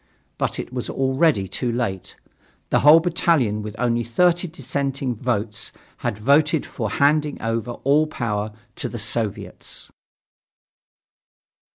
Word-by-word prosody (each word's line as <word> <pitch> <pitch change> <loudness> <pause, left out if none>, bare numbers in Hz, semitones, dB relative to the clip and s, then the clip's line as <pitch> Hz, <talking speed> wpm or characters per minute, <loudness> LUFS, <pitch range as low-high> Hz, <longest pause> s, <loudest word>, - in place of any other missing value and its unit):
But - - -1
it - - -6
was 125 -2 -3
already 135 - +2
too 120 +5 -2
late. 115 -6 -3 0.6
The - - +4
whole 150 +4 +8
battalion, 160 -10 +1
with 105 0 -7
only 120 -1 +1
thirty 175 - +2
dissenting 140 -5 -3
votes, 110 -3 -3 0.3
had 120 -4 -3
voted 145 +6 +3
for 110 -4 -4
handing 150 +5 +2
over 115 +1 -2
all 150 +3 +4
power 110 -6 -2 0.3
to - - -2
the - - -6
Soviets. - - -3
125 Hz, 125 wpm, -22 LUFS, 115-150 Hz, 0.6 s, whole